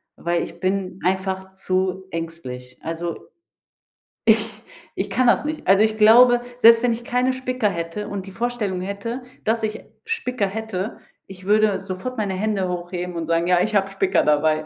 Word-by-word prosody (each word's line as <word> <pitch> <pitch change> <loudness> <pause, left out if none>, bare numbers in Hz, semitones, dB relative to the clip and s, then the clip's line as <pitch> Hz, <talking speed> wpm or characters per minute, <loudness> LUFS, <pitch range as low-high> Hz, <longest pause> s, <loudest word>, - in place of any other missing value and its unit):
weil 170 0 -1
ich - - -9
bin 190 0 -2
einfach 190 0 -1
zu 190 0 -1
ängstlich. 130 -7 -7
Also, 165 +1 -5 1.0
ich 220 -1 +6 0.6
ich - - -2
kann 255 -1 +2
das 240 - +3
nicht. 305 -6 -4
Also, 195 +3 +6
ich 220 0 +1
glaube, 240 +3 +7 0.2
selbst 230 -1 +8
wenn 240 -2 +3
ich 235 - -6
keine 250 +2 +1
Spicker 255 -4 -1
hätte 170 +3 -4
und 200 -1 -5
die 195 - -10
Vorstellung 215 -4 -2
hätte, 200 +6 -5 0.2
dass 225 +1 +1
ich 215 0 -3 0.2
Spicker 250 - -1
hätte, 215 0 -4 0.3
ich 185 -1 -12
würde 210 0 +3
sofort 195 +7 -6
meine 205 -3 -1
Hände 200 -1 -1
hochheben 175 0 -4
und 165 -1 -3
sagen: 165 0 +1
„Ja, 180 -1 +4
ich 215 +1 0
hab 195 -1 +2
Spicker 195 -2 +2
dabei.“ 155 +1 +2
195 Hz, 170 wpm, -22 LUFS, 180-225 Hz, 1.0 s, selbst